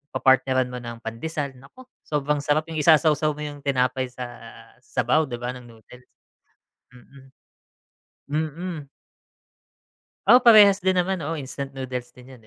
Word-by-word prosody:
papartneran 130 -1 +2
mo 125 - -6
ng 120 -1 -9
pandesal 140 +5 -4
naku, 140 - -16 0.2
sobrang 150 -1 -1
sarap 150 +2 0
yung 155 - -3
isasawaw 155 -1 +3
mo 150 - -7
yung 145 -1 -7
tinapay 130 -2 0
sa 125 0 -8 0.6
sabaw 155 +6 0
'di 120 - -5
ba, 120 +1 -4
ng 125 -1 -11
noodles. 120 +2 -17 0.9
Mm. 135 +2 -17 1.2
Mm. 165 -2 -7 1.4
Oo, 245 +4 +8
parehas 210 -5 +7
din 185 0 +1
naman, 185 +1 0
oo, 165 +1 -4
instant 140 -1 -7
noodles 125 -2 -6
din 125 +1 -15
yun, 130 - -14
140 Hz, 140 wpm, -23 LUFS, 125-155 Hz, 1.4 s, Oo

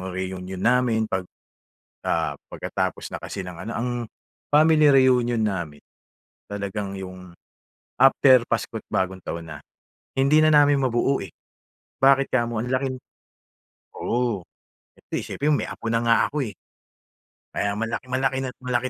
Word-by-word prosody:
reunion 95 0 -5
namin 120 -2 +2
pag, 95 -4 -3 0.8
ah, 80 -3 0
pagkatapos - - -3
na - - -5
kasi 100 - -6
ng 90 -2 -8
ano 115 - -4
ang, 125 +2 -2 0.6
family 155 0 +5
reunion 125 -4 +4
namin 85 -8 -3 0.7
talagang 100 -1 -4
yung, 90 -2 -9 0.6
after 130 -1 +6
Pasko't - - -2
Bagong 95 0 -1
Taon 85 0 -6
na. 75 -2 -8 0.6
Hindi 140 +3 +4
na 155 - +5
namin 145 -2 +5
mabuo 130 +1 +1
eh, 95 - -7 0.7
bakit 135 0 +4
kamo? 120 -3 0
Ang 125 - -4
laking 130 0 -1 1.0
oo 120 -7 -1 0.5
hindi - - -5
siyempre 145 - -3
may - - 0
apo - - -9
na 115 - +2
nga 115 0 +4
ako 150 -1 -1
eh. - - -10 1.0
Kaya 100 0 -1
malak 115 +1 -2
malaki 130 +1 0
na 130 - -3
malaki 125 0 -1
120 Hz, 135 wpm, -24 LUFS, 95-130 Hz, 1.0 s, after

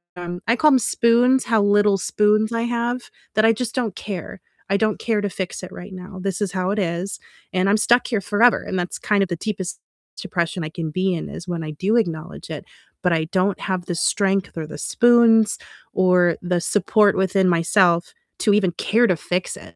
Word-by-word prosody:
um 175 0 -6
I 230 - +3
call 305 +3 +4
'em 260 - +5
spoons, 245 +3 +3
how 225 -2 +2
little 205 0 +3
spoons 210 +3 +1
I 230 - -1
have, 240 +1 -2 0.3
that 215 - +3
I 225 - +6
just 235 +1 -4
don't 240 -5 -1
care, 190 -2 -7 0.3
I 200 - +2
don't 215 0 0
care 225 -2 0
to 205 - -2
fix 185 -1 -5
it 185 - -8
right 190 +2 -10
now, 185 +1 -9
this 195 -1 -3
is 195 -2 -2
how 185 0 -1
it 210 - -1
is, 175 +2 -3 0.3
and 185 +1 +1
I'm 205 - +4
stuck 240 +3 +3
here 220 -5 -1
forever, 225 +5 +3
and 185 - -3
that's 175 - -4
kind 205 -2 +1
of - - -2
the 175 - -2
deepest 190 -3 -4 0.4
depression 170 -1 -3
I 155 - -4
can 160 -1 -5
be 185 +3 0
in, 165 - -4
is 175 - -8
when 175 -2 -3
I 155 - -5
do 195 +9 0
acknowledge 170 -5 -3
it, - - -6 0.4
but 180 - +2
I 160 -1 0
don't 185 +3 0
have 185 -2 -3
the 175 - -3
strength, 195 0 0
or 160 - -3
the 150 - -9
spoons, 235 -2 +4 0.4
or 180 -2 +3
the 180 -1 -1
support 205 +3 +2
within 190 0 +2
myself 170 0 +2 0.3
to 210 - +3
even 195 -4 +2
care 235 +6 +2
to 180 - +1
fix 180 +3 -3
it. 85 - -14
195 Hz, 215 wpm, -21 LUFS, 180-215 Hz, 0.4 s, I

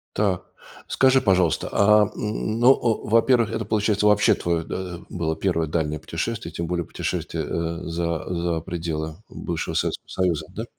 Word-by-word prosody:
Так, 100 -4 +1 0.4
скажи, 130 0 +4
пожалуйста, 95 -3 +2
а 105 +1 +5
н 110 +1 -2
ну, 125 +2 +8
а, 115 -5 -1
во-первых, 115 +1 +4
это, 115 -1 -2
получается, 105 -1 +1
вообще 105 -1 +5
твое, 85 -1 -1
да, 90 0 -5
было 80 -2 -2
1 85 -1 0
дальнее 75 -1 -1
путешествие, 85 +8 -4
тем 85 - -3
более 85 0 -2
путешествие, - - -3
э, 85 0 -3
за 85 -1 -2
за 85 -1 -1
пределы 80 -2 -4
бывшего - - -4
Советского - - -2
Союза, 90 -4 -1
да? - - -4
90 Hz, 155 wpm, -24 LUFS, 85-105 Hz, 0.4 s, ну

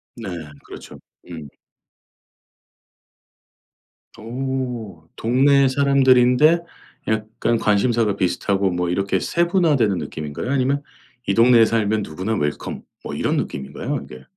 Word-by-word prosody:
네 115 -5 -7 0.4
그렇죠. - - -11 0.3
음. 80 -4 -8 2.7
오 120 -7 -5
동네 135 +4 +3
사람들인데 135 +3 +4 0.5
약간 110 +2 -1
관심사가 110 0 +1
비슷하고 95 +1 0
뭐 90 0 -2
이렇게 95 +2 0
세분화되는 165 - +1
느낌인가요 75 - -5
아니면 140 +1 +1 0.5
이 100 - +2
동네에 115 +1 +6
살면 110 -1 0
누구나 95 +6 -4
웰컴 75 -6 -3 0.2
뭐 - - -6
이런 - - -1
느낌인가요 70 0 -4
이게? 65 0 -12
115 Hz, 255 characters per minute, -21 LUFS, 95-130 Hz, 2.7 s, 동네에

